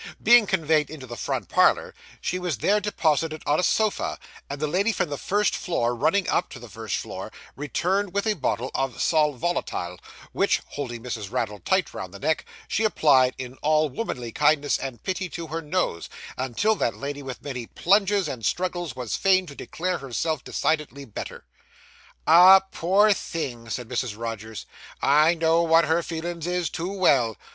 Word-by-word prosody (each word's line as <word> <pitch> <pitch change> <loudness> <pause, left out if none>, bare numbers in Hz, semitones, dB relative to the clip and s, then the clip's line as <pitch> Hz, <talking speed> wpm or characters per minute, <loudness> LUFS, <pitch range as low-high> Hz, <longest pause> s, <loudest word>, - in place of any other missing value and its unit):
Being 235 -3 +6
conveyed 160 -5 +1
into 150 -4 -9
the 120 -1 -8
front - - -3
parlour, - - +3 0.3
she 180 - -2
was 175 -7 -2
there 205 - +2
deposited 160 -6 0
on 145 - +2
a - - +1
sofa; 215 +3 +1 0.3
and 140 0 -5
the 155 - 0
lady 190 +9 +1
from 185 - -1
the 145 - -2
first 205 +1 +1
floor 120 -9 -1
running 165 +10 +1
up 180 - 0
to - - -10
the 120 - -11
first 110 0 -4
floor, - - -6 0.2
returned 180 +7 -1
with 200 +3 -1
a 215 - +2
bottle 130 - -2
of 135 -4 -2
sal 155 -2 +2
volatile, 125 - -3 0.3
which, - - +2
holding 120 -5 -6
Mrs. 110 -5 -5
Raddle 115 -5 -2
tight 190 -3 0
round 95 +1 -7
the - - -9
neck, 155 +2 0 0.2
she 225 - 0
applied 135 -11 +4
in 130 0 -7
all 155 0 +2
womanly 125 - -4
kindness 145 +2 +2
and 125 -5 -6
pity 185 -1 -3
to 170 -1 -6
her 165 +1 -4
nose, 155 - -2 0.3
until 130 - 0
that 115 - -1
lady 145 +1 -5
with 130 -2 -8
many 125 -5 -5
plunges 200 -1 +2
and 120 -4 -6
struggles 175 - -2
was 125 -3 -3
fain 185 -1 +3
to 145 - -10
declare 180 +5 -3
herself 140 +4 -2
decidedly 150 -3 -2
better. 110 - -8 0.8
'Ah, 180 +4 +9
poor 200 +5 +4
thing!' 125 -11 -5
said 120 0 -4
Mrs. 120 -3 -3
Rogers, 110 -1 -6 0.4
'I 155 +4 +5
know 165 0 +3
what 165 0 +4
her 160 +2 +2
feelin's 170 0 -5
is, 175 -3 -1
too 175 +3 -4
well. 135 - +2
155 Hz, 175 wpm, -25 LUFS, 125-180 Hz, 0.8 s, Ah